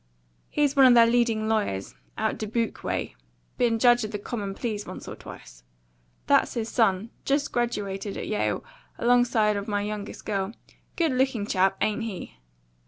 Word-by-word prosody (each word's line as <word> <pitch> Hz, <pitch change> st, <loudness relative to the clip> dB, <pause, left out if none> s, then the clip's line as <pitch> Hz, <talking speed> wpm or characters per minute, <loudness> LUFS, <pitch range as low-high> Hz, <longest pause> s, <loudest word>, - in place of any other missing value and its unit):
He's 290 Hz, -1 st, +1 dB
one 270 Hz, -2 st, +8 dB
of 245 Hz, -, +7 dB
their 230 Hz, -1 st, +8 dB
leading 230 Hz, -2 st, +2 dB
lawyers, 205 Hz, -, -1 dB, 0.2 s
out -, -, -1 dB
Dubuque 225 Hz, +1 st, -2 dB
way; -, -, -2 dB, 0.4 s
been 235 Hz, -2 st, +3 dB
judge 240 Hz, 0 st, +5 dB
of 215 Hz, -, -3 dB
the 210 Hz, -, -3 dB
Common 205 Hz, -2 st, -5 dB
Pleas 215 Hz, -3 st, -4 dB
once -, -, -8 dB
or -, -, -6 dB
twice. -, -, -12 dB, 0.6 s
That's -, -, +3 dB
his 230 Hz, -1 st, -2 dB
son 220 Hz, -1 st, +1 dB
just 280 Hz, +1 st, 0 dB
graduated 205 Hz, -4 st, -2 dB
at -, -, -4 dB
Yale 210 Hz, -, -1 dB, 0.3 s
alongside 235 Hz, -3 st, +3 dB
of 200 Hz, -, -4 dB
my 205 Hz, -1 st, 0 dB
youngest 210 Hz, 0 st, -6 dB
girl. 200 Hz, 0 st, -2 dB, 0.4 s
Good 330 Hz, -3 st, +2 dB
looking 255 Hz, -5 st, +1 dB
chap, 195 Hz, -1 st, +2 dB
ain't 215 Hz, +2 st, +1 dB
he?" 220 Hz, -5 st, -6 dB
220 Hz, 165 wpm, -26 LUFS, 205-240 Hz, 0.6 s, one